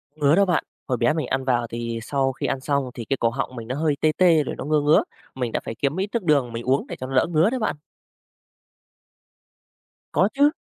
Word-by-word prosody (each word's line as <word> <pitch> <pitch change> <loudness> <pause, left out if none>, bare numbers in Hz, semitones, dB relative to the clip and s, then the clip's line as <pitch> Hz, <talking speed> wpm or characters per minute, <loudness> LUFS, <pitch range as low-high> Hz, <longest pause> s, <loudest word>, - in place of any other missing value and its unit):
Ngứa 150 0 +3
đó 200 - +4
bạn. 175 -4 +1 0.2
Hồi 125 -2 0
bé 150 - +2
mình 155 -1 -2
ăn 135 0 -1
vào 120 -2 +1
thì 115 0 -4
sau 135 +2 0
khi - - -5
ăn 135 - -1
xong 140 -1 -1
thì 115 -3 -7
cái 135 - -1
cổ 115 - +2
họng 130 +1 -4
mình 115 -1 -7
nó 130 - -3
hơi 150 0 +1
tê 155 - +4
tê 170 -5 +5
rồi - - -5
nó - - -6
ngưa 150 0 +2
ngứa. 150 +2 +4 0.3
Mình 125 -3 -2
đã - - -1
phải 115 - -6
kiếm 140 +8 -1
ít 195 - 0
nước 235 -5 -1
đường, 140 -7 +2
mình 115 - -4
uống 130 +2 +1
để - - -6
cho 130 - -5
nó 135 - -5
đỡ 130 - +4
ngứa 165 +6 +4
đấy 255 0 -2
bạn. 215 - -1 2.4
Có - - +4
chứ. 285 +2 +4
140 Hz, 250 wpm, -23 LUFS, 125-155 Hz, 2.4 s, tê